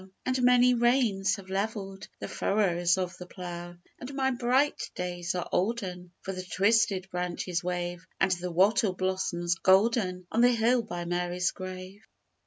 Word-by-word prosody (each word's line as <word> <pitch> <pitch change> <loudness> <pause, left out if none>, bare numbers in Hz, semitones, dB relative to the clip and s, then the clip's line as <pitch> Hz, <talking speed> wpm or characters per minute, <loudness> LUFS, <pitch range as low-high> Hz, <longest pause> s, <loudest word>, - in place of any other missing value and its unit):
And 255 0 0
many 250 0 +5
rains 235 -5 +2
have 190 -2 -11
levelled 195 -1 -3
The - - -6
furrows 175 -4 +1
of 180 -1 -2
the 180 - -9
plough; 175 -1 -7 0.2
And 250 - -7
my 265 -1 +1
bright 255 +3 +1
days 175 -1 -3
are 180 - -2
olden, 185 -3 -2
For 195 - -4
the 185 - -5
twisted 195 +1 +2
branches 180 0 -2
wave 175 -1 -3
And 190 - +3
the 180 0 -1
wattle 190 +3 +3
blossoms 185 -2 -1
golden 190 0 +2
On 230 - +2
the 245 0 +6
hill 235 +2 +3
by 175 -6 -6
Mary's 175 +1 -1
grave. 185 +1 -8
190 Hz, 155 wpm, -28 LUFS, 180-225 Hz, 0.2 s, the